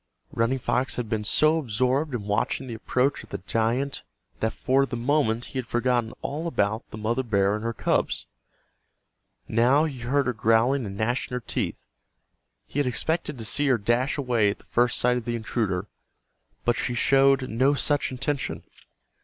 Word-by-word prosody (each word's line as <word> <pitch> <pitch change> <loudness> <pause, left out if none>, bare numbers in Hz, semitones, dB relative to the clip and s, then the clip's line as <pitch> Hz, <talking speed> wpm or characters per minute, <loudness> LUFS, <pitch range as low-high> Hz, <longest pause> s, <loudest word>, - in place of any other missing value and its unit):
Running 115 +3 +1
Fox 130 +1 -1
had 120 -3 -4
been 110 -1 -1
so 155 +9 +3
absorbed 130 +3 0
in 110 - -4
watching 105 +6 -1
the 120 - -6
approach 125 +4 0
of - - -15
the - - -4
giant 120 +5 -1 0.4
that 110 - 0
for 135 +4 +1
the 120 - -4
moment 120 -2 +1
he 130 - -1
had 125 - -5
forgotten 120 -1 +1
all 155 +4 -3
about 110 -7 -1
the - - -8
mother 115 +4 0
bear 100 -5 +1
and 110 - -5
her 115 - -1
cubs. - - 0 1.2
Now 125 +7 +4
he 140 -5 -5
heard 135 +4 +1
her 125 - 0
growling 115 +3 +2
and 100 0 -7
gnashing 120 +4 -1
her - - -1
teeth. 120 - -3 0.8
He 145 - -4
had 145 - +1
expected 150 +3 -1
to 115 - -6
see 145 +6 +2
her 130 -3 +4
dash 120 +7 0
away 120 -7 +2
at 100 - -3
the - - -22
first 120 0 +2
sight 125 0 +2
of 120 - -5
the 120 - -1
intruder, 110 -5 -1 0.8
but 120 - +3
she 120 +1 -2
showed 135 +1 +4
no 130 +6 +2
such 145 0 +1
intention. 135 +2 -3
125 Hz, 180 wpm, -26 LUFS, 115-135 Hz, 1.2 s, Now